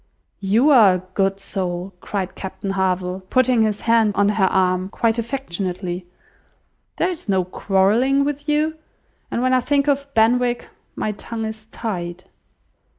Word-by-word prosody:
"You 220 +9 +3
are 215 -9 +7
a 180 - -5
good 195 0 +1
soul," 185 -1 -3
cried 190 -3 -3
Captain 195 0 -5
Harville, 185 -1 -1
putting 255 -2 +3
his 215 -1 0
hand 225 -2 +3
on 205 0 +3
her 210 -2 +2
arm, 185 0 +1
quite 230 +2 0
affectionately. 185 -7 -4 0.9
"There - - +1
is 325 - -7
no 190 -2 +2
quarrelling 210 +9 +2
with 290 +1 -3
you. 305 +1 +1 0.5
And 240 - -1
when 255 0 +2
I 255 - +5
think 280 +2 +1
of 280 -1 0
Benwick, 240 +2 +2 0.3
my 215 - -1
tongue 225 +2 -5
is 220 0 -7
tied." 180 -6 -5
215 Hz, 150 wpm, -21 LUFS, 190-250 Hz, 0.9 s, are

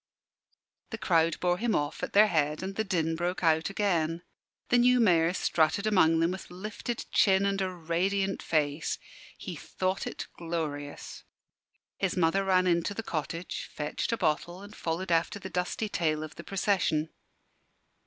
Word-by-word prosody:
The 225 - -5
crowd 165 -5 +2
bore 180 0 +1
him 235 0 +1
off 145 +1 -2
at - - -4
their 210 +2 +8
head, 155 -4 0
and 195 +1 -4
the 220 - 0
din 165 -5 0
broke 175 +2 -2
out 160 0 +3
again. 175 -5 0 0.5
The 245 - +5
new 250 +1 +5
Mayor 170 -7 +4
strutted 175 +2 +1
among 165 -6 +4
them 165 +1 +2
with 190 - -7
lifted 215 +6 -5
chin 195 -1 +4
and 200 0 0
a 190 - 0
radiant 185 +3 -1
face. 150 -1 0 0.4
He - - -6
thought 185 +1 -2
it - - -5
glorious. 155 -4 -5 0.7
His 190 -1 -1
mother 180 +3 +3
ran 185 -1 +3
into 175 +2 +1
the 225 - -4
cottage, 165 0 -4
fetched 150 +8 -3
a 230 - 0
bottle 175 +2 -1
and 205 +1 -11
followed 175 +2 -3
after 165 +4 +2
the 200 - -8
dusty 180 +4 -1
tail 155 -6 0
of 155 0 -8
the - - -10
procession. 185 -6 0
180 Hz, 165 wpm, -29 LUFS, 160-195 Hz, 0.7 s, their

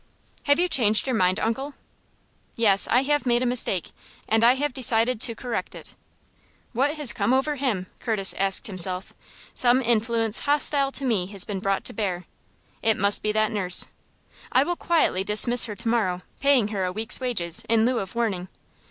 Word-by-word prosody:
"Have 285 -1 +3
you 355 +1 +2
changed 220 -9 +2
your 260 -3 -1
mind, 185 0 +1
uncle?" 270 +6 -3 0.8
"Yes; 205 -4 +2
I 250 +2 +2
have 290 -1 0
made 240 +1 +1
a - - -1
mistake, 235 -8 0 0.4
and 225 +1 +1
I 240 +2 +6
have 290 0 -2
decided 235 -2 +1
to 230 - +2
correct 245 -1 -5
it." - - -11 0.8
"What 280 +6 0
has 295 -5 +1
come 255 - 0
over 270 +3 0
him?" 245 -10 -2
Curtis 210 -4 0
asked 195 0 +2
himself. 185 -1 -1 0.4
"Some 250 0 +3
influence 225 -2 0
hostile 285 -1 +1
to 275 - 0
me 210 -8 0
has 195 -2 -2
been 200 -2 -5
brought 195 0 -2
to - - -3
bear. 185 -4 -4 0.6
It 220 -2 +1
must 200 +1 +2
be 215 - -1
that 215 0 +1
nurse. 185 -4 +1 0.6
I - - +3
will 350 - -3
quietly 325 - 0
dismiss 230 +4 +3
her 210 -3 -7
to 235 +3 -6
morrow, 190 -6 -1 0.2
paying 275 -7 +2
her 200 -3 -3
a 180 - -2
week's 220 +3 -1
wages, 190 -10 +3
in 225 -1 +3
lieu 250 -1 0
of 195 +2 -7
warning. 200 -6 -2
225 Hz, 185 wpm, -24 LUFS, 200-255 Hz, 0.8 s, I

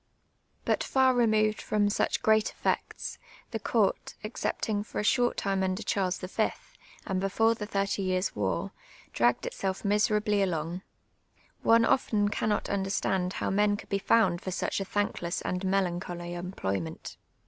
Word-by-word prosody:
But - - +1
far 260 -1 +3
removed 215 -3 +2
from 210 -1 +1
such - - 0
great 220 0 +4
effects, - - -3 0.3
the 225 - -2
court, 215 -1 0
except 215 +2 -3
ing 205 -2 0
for - - -9
a - - 0
short 245 +3 +2
time 195 -1 0
under 190 +3 -1
Charles 190 -3 0
V,, 195 +4 0 0.6
and 190 -1 -1
before 225 +4 +3
the 210 -2 -6
Thirty 200 -1 -1
Years' 185 0 0
war, 95 -4 -1 0.4
di - - -2
ajjiied 120 - -11
itself 190 -1 -3
miserablv 210 0 +2
along. 170 -1 -1 0.8
One 230 0 +5
often 210 -5 +2
cannot 210 0 0
understand 190 -2 0
how - - -2
men 205 +1 +2
coidd - - -12
be 200 - 0
found 205 -4 +3
for - - -4
such 185 - -1
a 195 - -3
thankless 190 -3 -1
and 180 +1 -3
melancholy 175 -2 -1
em])loT^'ment. 100 - -4
195 Hz, 155 wpm, -29 LUFS, 185-215 Hz, 0.8 s, One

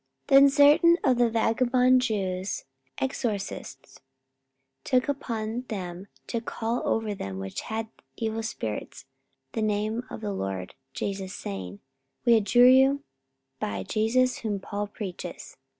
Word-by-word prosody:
44:019:013 275 -1 +9
Then 280 0 +7
certain 295 +4 +6
of 255 -2 +3
the 240 -1 +4
vagabond 250 +3 +3
Jews, 195 -5 -2 0.3
exorcists, 210 - -4 0.8
took 255 0 +2
upon 235 -4 -3
them 185 -3 -6 0.2
to 230 - -3
call 230 +1 -2
over 220 -2 0
them 95 - -6
which 95 0 -5
had 220 0 -4 0.3
evil 225 -1 -2
spirits 220 - -5 0.5
the 225 - -2
name 215 +2 0
of - - -7
the 205 -2 -3
LORD 95 - -4 0.2
Jesus, 195 -2 -4
saying, 95 0 -6 0.4
We 235 -1 +6
adjure 225 +3 +5
you 265 +2 +5 0.6
by 100 -2 -3
Jesus 245 - +1
whom 210 -3 -2
Paul 205 +2 -4
preacheth. 200 -3 -7
220 Hz, 130 wpm, -27 LUFS, 195-250 Hz, 0.8 s, 44:019:013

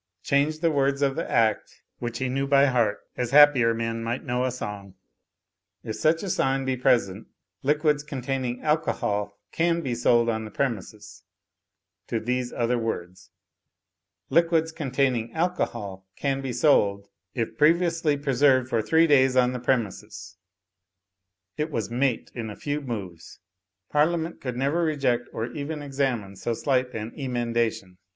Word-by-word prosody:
Change 150 +3 +1
the 165 -1 +3
words 140 -1 +1
of 135 -1 +1
the - - -3
Act 110 -2 0 0.2
(which 120 -1 -4
he 130 +1 -1
knew 135 +2 -1
by 140 0 +5
heart, 120 -6 +1
as 125 -2 -2
happier 140 -4 +6
men 115 0 -3
might 120 +3 -3
know 125 -1 -1
a 130 - 0
song): 100 -5 -7 0.9
"If 110 - -5
such 160 +1 +2
sign 135 -8 0
be 130 -1 0
present 110 -5 +1 0.3
liquids 150 +1 +2
containing 130 -3 -4
alcohol 105 -10 -1
can 170 0 +1
be 130 -6 -2
sold 120 0 +3
on 110 -1 -1
the 110 - -7
premises," 115 -3 -4 0.9
to 115 - -1
these 125 +2 -2
other 120 0 0
words: 95 -4 -5 1.0
"Liquids 165 +1 +3
containing 130 -6 -1
alcohol 115 - -2
can 135 -1 -1
be 135 -2 -4
sold, 100 -7 +2 0.3
if 115 -2 -2
previously 165 -1 +2
preserved 135 -2 +2
for 115 -3 +1
three 160 +8 +4
days 135 -4 +4
on 125 0 +3
the 125 - -4
premises"; 120 -5 -3 1.2
it 150 +1 -1
was 115 -7 -3
mate 125 0 0
in 115 -3 -5
a 105 - -7
few 145 0 -3
moves. 100 - -7 0.5
Parliament 165 +2 +1
could 125 -2 -4
never 140 +6 +1
reject 135 -6 0
or 110 - -3
even 150 +1 -5
examine 130 -8 -2
so 115 +4 -3
slight 130 0 0
an 110 +1 -4
emen 120 -4 -3
dation. 110 -6 -1
130 Hz, 150 wpm, -25 LUFS, 115-145 Hz, 1.2 s, happier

